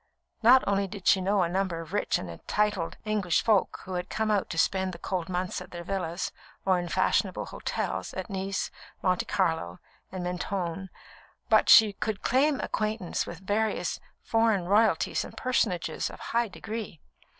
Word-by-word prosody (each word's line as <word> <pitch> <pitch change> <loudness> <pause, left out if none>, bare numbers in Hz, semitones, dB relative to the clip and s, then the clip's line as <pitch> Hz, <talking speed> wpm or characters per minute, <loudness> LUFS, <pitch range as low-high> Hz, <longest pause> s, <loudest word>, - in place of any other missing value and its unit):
Not 250 +3 +7
only 200 0 +1
did 195 -1 -9
she 190 - +5
know 195 0 +2
a - - +1
number 185 -1 -1
of 165 +2 -9
rich 205 - +1
and 85 -3 -8
titled 205 -5 0
English 205 -5 +1
folk, 215 -4 +2
who 185 - -7
had 180 +1 -3
come 220 -1 0
out 205 -2 +1
to 165 - -5
spend 190 +2 +1
the - - -7
cold 180 0 -3
months 180 0 -2
at - - -10
their 175 -1 -7
villas, 180 -1 -3 0.3
or 190 -2 +3
in 175 - -4
fashionable - - +1
hotels, 95 -1 -3
at 185 - -4
Nice, 195 -1 -3 0.3
Monte 185 -1 +2
Carlo, 160 - 0 0.3
and 185 -1 -4
Mentone, 180 0 -3 0.6
but - - +5
she 215 -2 +8
could 210 +1 -3
claim 275 +2 +3
acquaintance 215 -4 -2
with 180 +3 -9
various 215 +2 0 0.2
foreign 225 -5 +2
royalties 210 +4 +2
and - - -11
personages 220 -9 0
of - - -11
high 235 0 0
degree. 215 -3 -6
190 Hz, 170 wpm, -28 LUFS, 180-215 Hz, 0.6 s, she